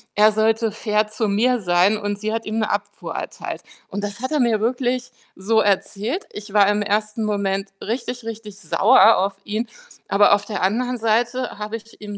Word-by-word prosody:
er 215 Hz, +1 st, +6 dB
sollte 220 Hz, +1 st, +1 dB
fair 210 Hz, -1 st, 0 dB
zu 215 Hz, +1 st, -2 dB
mir 240 Hz, +5 st, +2 dB
sein, 180 Hz, +3 st, +3 dB
und 205 Hz, -1 st, -3 dB
sie 215 Hz, +1 st, -2 dB
hat 225 Hz, 0 st, -3 dB
ihm 215 Hz, +1 st, -2 dB
'ne 215 Hz, -, 0 dB
Abfuhr 205 Hz, 0 st, -4 dB
erteilt. -, -, -5 dB, 0.3 s
Und 205 Hz, +1 st, -4 dB
das 205 Hz, +1 st, -4 dB
hat 260 Hz, -, -3 dB
er 300 Hz, -, +1 dB
mir 235 Hz, -3 st, +2 dB
wirklich 250 Hz, +2 st, -1 dB, 0.3 s
so 220 Hz, +4 st, +1 dB
erzählt. 210 Hz, -, -1 dB
Ich 210 Hz, -1 st, -9 dB
war 205 Hz, -2 st, +5 dB
im 205 Hz, 0 st, +2 dB
ersten 215 Hz, +2 st, -1 dB
Moment 200 Hz, -1 st, -1 dB
richtig, 245 Hz, +2 st, -4 dB
richtig 220 Hz, -3 st, -8 dB
sauer 220 Hz, +6 st, +5 dB
auf 195 Hz, +2 st, 0 dB
ihn, 215 Hz, +3 st, -3 dB, 0.4 s
aber 205 Hz, +1 st, +5 dB
auf 205 Hz, -, -4 dB
der 210 Hz, -, -4 dB
anderen 245 Hz, +6 st, 0 dB
Seite 240 Hz, +3 st, 0 dB
habe 210 Hz, +1 st, -4 dB
ich 225 Hz, +1 st, -17 dB
ihm 205 Hz, -1 st, -7 dB
215 Hz, 190 wpm, -21 LUFS, 205-230 Hz, 0.4 s, er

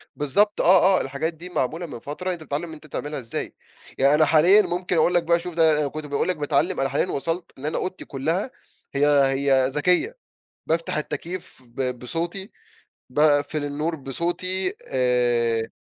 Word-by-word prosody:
بالضبط 180 Hz, +9 st, +1 dB
آه، 185 Hz, +1 st, +5 dB
آه، -, -, 0 dB
الحاجات 140 Hz, +5 st, -3 dB
دي 175 Hz, +3 st, -8 dB
معمولة 165 Hz, +3 st, -2 dB
من 145 Hz, -, -8 dB
فترة، 180 Hz, +8 st, -4 dB
أنت 165 Hz, -2 st, -7 dB
بتتعلم 160 Hz, +3 st, -4 dB
أنت 155 Hz, 0 st, -13 dB
تعملها 145 Hz, +1 st, -4 dB
إزاي، 115 Hz, -2 st, -4 dB, 0.4 s
يعني 140 Hz, +2 st, +4 dB
أنا 155 Hz, -, +4 dB
حاليًا 170 Hz, +7 st, +6 dB
ممكن 180 Hz, -1 st, -2 dB
أقول 175 Hz, +3 st, +3 dB
لك 175 Hz, -1 st, +3 dB
بقى 170 Hz, +1 st, +2 dB
شوف 175 Hz, 0 st, -7 dB
ده 160 Hz, -2 st, +4 dB
أنا 145 Hz, -, 0 dB
كُنت 155 Hz, +2 st, -6 dB
باقول 145 Hz, +3 st, -1 dB
لك 180 Hz, -, 0 dB
باتعلم، 150 Hz, +4 st, 0 dB
أنا 135 Hz, -, +1 dB
حاليًا 185 Hz, -, 0 dB
وصلت 165 Hz, +5 st, -3 dB
إن 140 Hz, -, -8 dB
أنا 155 Hz, -, -1 dB
أوضتي 185 Hz, 0 st, -4 dB
كُلَّها 165 Hz, -, -2 dB, 0.4 s
هي 145 Hz, +1 st, +3 dB
هي 135 Hz, -2 st, +4 dB
ذكية، 180 Hz, -, +1 dB, 0.5 s
بافتح 165 Hz, -1 st, -1 dB
التكييف 170 Hz, -1 st, -5 dB
ب 125 Hz, 0 st, -3 dB
بصوتي، 170 Hz, -, -4 dB, 0.6 s
باقفل 150 Hz, 0 st, +2 dB
النور 150 Hz, +3 st, -3 dB
بصوتي، 175 Hz, +7 st, -2 dB
آآ 120 Hz, -, +1 dB
155 Hz, 170 wpm, -23 LUFS, 140-175 Hz, 0.6 s, حاليًا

